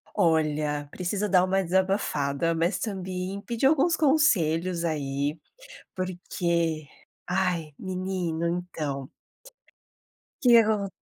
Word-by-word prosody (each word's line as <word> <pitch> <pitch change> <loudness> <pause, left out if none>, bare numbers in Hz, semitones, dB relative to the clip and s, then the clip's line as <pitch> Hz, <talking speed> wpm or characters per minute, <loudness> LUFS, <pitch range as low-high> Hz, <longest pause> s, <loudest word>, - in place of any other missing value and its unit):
Olha, 155 -5 +1
preciso 195 +3 -2
dar 185 -1 +5
uma 190 +1 +1
desabafada, 170 -5 0
mas 170 +4 0
também 190 -1 -4
pedir 235 +4 -2
alguns 315 +3 +3
conselhos 185 - +2
aí, 145 -1 -2 0.6
porque, 170 -3 -2 0.4
ai 180 -4 0
menino, 185 -3 -3 0.2
então 140 -5 -4 1.3
que 255 - +3
que 235 - +9
acon 215 -3 +1
180 Hz, 100 wpm, -26 LUFS, 160-195 Hz, 1.3 s, que